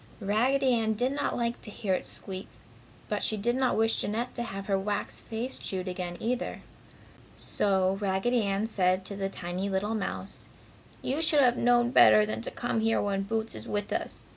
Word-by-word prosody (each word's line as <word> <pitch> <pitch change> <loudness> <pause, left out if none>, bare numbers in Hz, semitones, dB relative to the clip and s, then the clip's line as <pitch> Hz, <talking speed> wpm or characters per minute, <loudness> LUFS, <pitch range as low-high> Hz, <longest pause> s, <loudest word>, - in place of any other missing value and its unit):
Raggedy 250 +6 +2
Ann 220 -2 +2
did 245 +5 0
not 285 +1 -1
like 235 0 -1
to - - -6
hear 205 -2 -2
it - - -2
squeak, 190 0 -5 0.6
but - - -1
she 215 - 0
did 240 +4 0
not 260 -1 +1
wish 225 0 +2
Jeanette 230 +4 -2
to - - -3
have 195 -4 -5
her 195 - +1
wax 200 +1 -2
face 235 +4 -4
chewed 185 -1 -3
again, 180 -1 -4
either. 245 +2 -2 0.7
So, 190 -1 +1
Raggedy 205 +5 +1
Ann 200 0 0
said 185 -4 +1
to 200 - -6
the 195 0 -2
tiny 185 +1 -3
little 195 +3 0
mouse, 215 -3 -4 0.5
"You 280 +5 0
should 310 -3 +4
have 245 -2 +5
known 240 0 +3
better 215 -4 +7
than 215 - -3
to - - -2
come 240 -2 -2
here 225 +1 +2
when 200 -1 0
Boots 220 +2 -2
is - - -7
with 205 0 -2
us. - - -4
215 Hz, 190 wpm, -29 LUFS, 195-240 Hz, 0.7 s, better